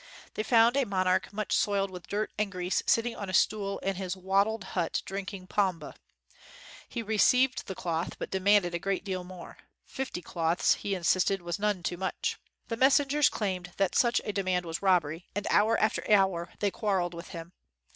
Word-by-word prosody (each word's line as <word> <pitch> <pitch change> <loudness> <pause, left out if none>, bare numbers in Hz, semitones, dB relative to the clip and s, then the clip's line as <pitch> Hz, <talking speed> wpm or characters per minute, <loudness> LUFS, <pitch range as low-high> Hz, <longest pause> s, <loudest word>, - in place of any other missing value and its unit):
They - - -2
found 230 +2 +4
a 280 - +3
monarch 185 -4 0
much 210 0 -1
soiled 200 -1 +1
with 180 -2 -10
dirt 210 +1 -2
and 210 -1 -1
grease 180 -1 -1
sitting 230 +1 +2
on 200 - -6
a 185 - -1
stool 200 -1 +1
in 195 -1 -3
his 190 -1 -4
wattled 200 +3 +1
hut 175 -3 -1
drinking 195 -1 -6
pombe. 185 -3 -1 1.0
He 235 - -4
received 250 +4 +2
the 190 - -5
cloth, 170 -1 -3
but - - -6
de 190 - -1
manded 195 -2 +3
a 170 - -1
great 195 +1 -2
deal 185 -2 -3
more. 180 -1 -11 0.3
Fifty 260 -9 -5
cloths, 165 0 +1
he 200 -1 -3
insisted 185 +1 +1
was 175 +2 -3
none 205 -3 0
too 175 0 -2
much. 190 +1 -3 0.3
The 230 - -3
mes 265 +3 +6
sengers 290 +1 +3
claimed 180 -4 -3
that 195 -2 +1
such 240 -1 +3
a 210 - -3
demand 185 -3 0
was 165 0 -4
rob 185 -4 +4
bery 160 +4 -8
and 205 - -2
hour 220 +2 +4
after 215 - +1
hour 190 -4 +3
they 205 -1 +1
quarreled 190 -5 -1
with 170 +1 -8
him. 170 -1 -9
195 Hz, 195 wpm, -29 LUFS, 180-210 Hz, 1.0 s, mes